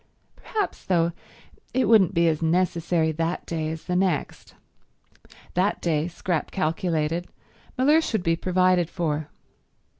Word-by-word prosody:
Perhaps, 425 -3 -4
though, 170 -2 +2 0.6
it 260 - +2
wouldn't 200 -4 +5
be 170 0 +4
as 155 -1 +1
necessary 170 -1 +1
that 165 +3 -2
day 160 -2 -3
as 160 0 -6
the 180 - -2
next. 180 -5 -1 1.0
That 190 +4 +1
day, 160 -2 0
Scrap 175 -2 -2
calculated, 165 -1 -1 0.5
Mellersh 300 +5 +3
would 215 -5 0
be 165 -1 +2
provided 180 -1 +2
for. 155 -4 -2
170 Hz, 125 wpm, -25 LUFS, 160-185 Hz, 1.0 s, wouldn't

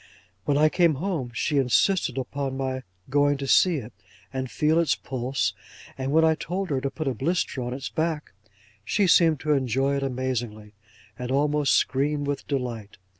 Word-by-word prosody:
When 140 - +2
I 155 +1 +5
came 170 -1 +3
home, 160 -5 -2
she 140 +5 0
insisted 135 +2 +2
upon 135 0 -3
my 130 -1 -2 0.3
going 145 0 +3
to 135 - -4
see 175 +5 +4
it, 125 -5 -6 0.4
and 130 -1 -3
feel 155 +5 +2
its 165 -5 +2
pulse; 130 -5 -2 0.4
and 135 0 -3
when 160 +2 +5
I 160 - +4
told 180 +3 -4
her 135 -2 0
to 140 - -1
put 155 +1 -5
a 135 - +1
blister 145 +1 -1
on 125 0 -3
its 135 +2 -5
back, 160 -2 -2 0.5
she 205 - +1
seemed 165 -4 +5
to 155 -1 +2
enjoy 135 +1 +1
it - - -2
amazingly, 120 -5 -3 0.5
and 125 0 -4
almost 145 +1 +2
screamed 145 +2 +1
with 140 0 -3
delight. 120 -7 -4
140 Hz, 175 wpm, -25 LUFS, 130-155 Hz, 0.5 s, I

